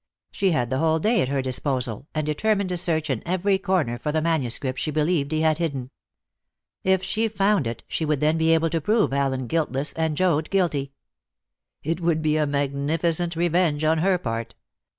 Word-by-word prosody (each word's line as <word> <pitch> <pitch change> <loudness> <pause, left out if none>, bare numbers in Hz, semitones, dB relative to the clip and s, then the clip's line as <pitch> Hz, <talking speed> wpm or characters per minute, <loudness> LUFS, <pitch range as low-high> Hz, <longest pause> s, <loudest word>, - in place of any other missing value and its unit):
She 195 - +1
had 125 -7 0
the 130 - 0
whole 160 +1 +2
day 215 +5 +2
at - - 0
her 135 0 -1
disposal, 130 -1 -2
and 155 -1 0
determined 200 +6 0
to 180 - -1
search 160 -3 0
in - - -2
every 185 +2 +1
corner 180 -12 0
for 150 - -2
the 155 - +1
manuscript 135 -5 -1
she - - -2
believed 155 -1 0
he 155 0 0
had 160 0 +2
hidden. 140 -6 -3 0.9
If 190 0 +2
she 215 +4 0
found 200 - +1
it, 115 0 -5
she - - -3
would 150 -2 0
then 155 +2 +2
be 160 0 +3
able 165 0 +1
to 165 -1 0
prove 210 -3 +2
Allen 135 -2 0
guiltless 145 0 -1
and 160 -2 -1
Joad 160 -4 +1
guilty. 160 -8 0 0.9
It 165 +3 -1
would 165 -2 +1
be 155 0 +2
a 150 -1 +1
magnificent 150 +5 -1
revenge 170 -2 +1
on 160 +1 +3
her 185 +2 +2
part. 115 -5 -4
155 Hz, 190 wpm, -24 LUFS, 140-175 Hz, 0.9 s, be